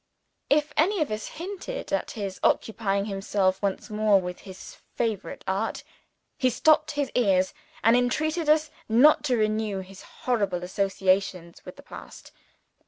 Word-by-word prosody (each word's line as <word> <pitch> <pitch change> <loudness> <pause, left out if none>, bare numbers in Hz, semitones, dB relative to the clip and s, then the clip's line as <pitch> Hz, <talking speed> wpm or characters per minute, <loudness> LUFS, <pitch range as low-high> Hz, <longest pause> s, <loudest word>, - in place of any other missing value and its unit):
If 300 +1 +2
any 380 +6 +3
of 290 - -8
us 215 0 -4
hinted 395 +8 -6
at - - 0
his 195 -3 -4
occupying 200 -2 +1
himself 195 -1 0
once 200 +2 -2
more 210 -1 +3
with 180 -1 -6
his 190 - -11 0.2
favorite 225 -4 -3
art, 195 +4 -2 0.6
he 255 - +3
stopped 305 +5 +3
his 285 -2 -2
ears, 190 -6 +2 0.3
and 230 +1 +6
entreated 305 +6 0
us 305 0 +3 0.2
not 260 +9 +5
to 255 -4 +2
renew 215 -2 0
his 190 0 -12
horrible 200 -8 -2
associations 190 -2 -1
with - - -9
the - - -14
past. - - -12
215 Hz, 145 wpm, -26 LUFS, 195-285 Hz, 0.6 s, and